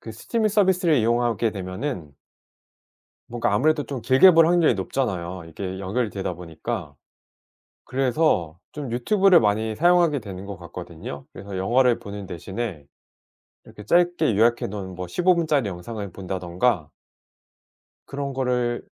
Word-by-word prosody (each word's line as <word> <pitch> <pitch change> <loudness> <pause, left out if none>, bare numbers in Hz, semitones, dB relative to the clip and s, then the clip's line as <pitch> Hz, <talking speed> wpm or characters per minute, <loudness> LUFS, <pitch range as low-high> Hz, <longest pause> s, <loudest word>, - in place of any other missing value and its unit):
...그 115 - -9
스트리밍 215 - -1
서비스를 185 -6 +3
이용하게 115 -1 +1
되면은. 95 - -5 1.1
뭔가 120 -3 -1
아무래도 150 +8 +2
좀 135 -3 -5
길게 130 +11 +7
볼 165 -1 +6
확률이 170 -6 +4
높잖아요. 95 -4 -3
이게 95 +3 -6
연결이 105 +4 -2
되다 95 -3 -4
보니까. 85 0 -6 0.9
그래서 130 - 0
좀 145 -5 -6
유튜브를 190 - +4
많이 110 +1 0
사용하게 175 -3 +4
되는 100 -2 -8
것 100 -1 -6
같거든요. 85 -5 -8
그래서 100 0 -8
영화를 120 +6 +3
보는 100 -1 -8
대신에 95 -2 -5 0.8
이렇게 105 - -12
짧게 175 - +2
요약해 115 +3 +3
놓은 95 -2 -6
뭐 90 0 -5
15분 175 - +2
짜리 140 -8 +1
영상을 100 +3 -6
본다든가 90 -1 -1 1.2
그런 140 0 -4
거를 125 -2 0
115 Hz, 315 characters per minute, -24 LUFS, 95-140 Hz, 1.2 s, 길게